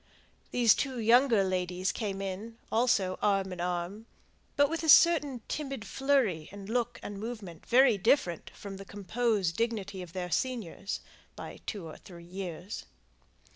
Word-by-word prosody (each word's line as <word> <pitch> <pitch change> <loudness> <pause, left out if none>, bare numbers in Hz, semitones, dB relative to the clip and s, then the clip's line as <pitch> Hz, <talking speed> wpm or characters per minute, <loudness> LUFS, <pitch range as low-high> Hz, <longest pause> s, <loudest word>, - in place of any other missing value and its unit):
These 235 -4 +5
two 265 -2 -2
younger 230 -1 +5
ladies 185 0 -1
came 195 -3 -3
in, 205 +4 -5
also 220 -5 +2
arm 195 -2 +1
in 175 - -6
arm, 180 +5 -3 0.5
but 285 0 +5
with 330 +3 -2
a 320 - -1
certain 295 -7 +6
timid 275 -7 -4
flurry 255 - +1
in 200 0 -9
look 235 +3 -1
and 205 -1 -6
movement 210 -7 -7
very 245 -4 +5
different 180 - +2
from 195 -1 -8
the 195 - -8
composed 205 -2 -1
dignity 205 -5 -2
of 175 -2 -9
their 180 -2 -4
seniors 205 -2 -2 0.3
(by - - -8
two 200 -6 -4
or 160 - -9
three 170 -2 -13
years). 180 +1 -6
205 Hz, 150 wpm, -30 LUFS, 185-240 Hz, 0.5 s, certain